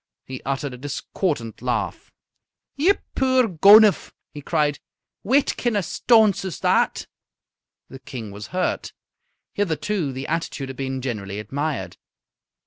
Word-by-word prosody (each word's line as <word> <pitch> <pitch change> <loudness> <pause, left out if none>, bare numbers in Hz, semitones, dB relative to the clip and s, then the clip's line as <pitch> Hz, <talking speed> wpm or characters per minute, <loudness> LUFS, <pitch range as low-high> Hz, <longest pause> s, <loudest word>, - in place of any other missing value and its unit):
He 130 -1 -7
uttered 135 0 -2
a 125 - -10
discordant 145 - -3
laugh. 125 0 -2 0.7
"Ye 335 +8 +4 0.2
puir 260 -2 +3
gonuph!" 205 +4 +6 0.2
he 145 - -8
cried, 150 -2 0 0.4
"whitkin' 245 -1 +1
o' - - +3
a - - -7
staunce 215 0 +3
is 190 -3 -5
that?" - - +2 0.8
The 135 - -11
King 120 -5 -8
was 100 +1 -8
hurt. 180 +6 -2 0.6
Hitherto 180 -3 -1
the 130 +1 -6
attitude 155 -4 -3
had 135 - -7
been 130 -1 -4
generally 105 -6 -4
admired. 120 - -4
145 Hz, 130 wpm, -23 LUFS, 130-200 Hz, 0.8 s, gonuph